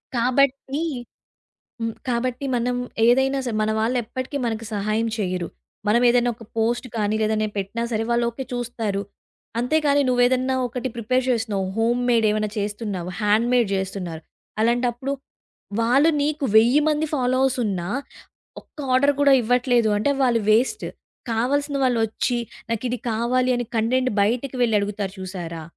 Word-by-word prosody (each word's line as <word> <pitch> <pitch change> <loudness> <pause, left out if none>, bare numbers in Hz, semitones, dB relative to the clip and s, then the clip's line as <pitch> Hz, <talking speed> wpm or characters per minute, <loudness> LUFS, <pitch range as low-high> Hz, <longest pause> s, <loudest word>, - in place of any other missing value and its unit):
కాబట్టి 270 +4 +1 1.0
హ్మ్. 230 0 -1 0.2
కాబట్టి 250 +2 -1
మనం 245 +1 0 0.3
ఏదైనా 265 +3 +3
సరే 230 -3 -2
మన 215 - +1
వాళ్ళెప్పటికి 250 +4 -2
మనకు 225 -1 -3
సహాయం 215 +3 0
చేయరు. 180 -3 -2 0.4
మనం 235 +3 +4
ఏదైనా 245 0 +3
ఒక 230 - -12
పోస్ట్ 240 +3 0
కానీ 210 -1 0
లేదా 215 0 +1
ఏదైనా 215 0 0
పెట్టినా 200 +4 -3
సరే 220 0 0
వాళ్ళు 235 0 +2
ఓకే 235 +3 -6
చూస్తారు. 230 -5 -2 0.6
అంతే 250 +7 +2
కానీ, 285 0 +4
నువేదన్నా 255 +1 +2
ఒకటి 250 +1 -4
ప్రిపేర్ 255 +3 0
చేస్తున్నావు, 220 -5 0
హోమ్‌మేడ్ 240 0 +2
ఏవైనా 215 0 0
చేస్తున్నావు, 205 -3 -3
హ్యాండ్‌మేడ్ 230 +2 +3
జేస్తున్నారు. 190 -4 -4 0.4
అలాంటప్పుడు 240 +3 +1 0.7
వాళ్ళు 265 +7 +4
నీకు 295 0 -1
1000 240 +6 +6
మంది 305 +1 +1
ఫాలోవర్స్ 255 -1 +1
ఉన్నా 185 -5 -2 0.7
ఒక్క - - -31 0.2
ఆర్డర్ 280 +2 +4
గూడా 285 -1 +6
ఇవ్వట్లేదు 245 0 +2
అంటే, 250 +7 +1
వాళ్ళు 240 -3 +3
వేస్ట్. 255 - +2 0.5
కావాల్సిన 280 +5 0
వాళ్ళు 245 -3 +2
ఒచ్చి, 240 +3 -1 0.3
నాకు 230 +1 -2
ఇది 245 - -2
కావాలి 250 +3 +1
అని 245 -1 -3
కంటెంట్ 255 +3 +1
బయటకి 245 +6 0
వెళ్ళి 225 -3 +3
అడుగుతారు 200 -1 -3
చూశారా? 175 -3 -6
235 Hz, 140 wpm, -23 LUFS, 215-255 Hz, 1.0 s, 1000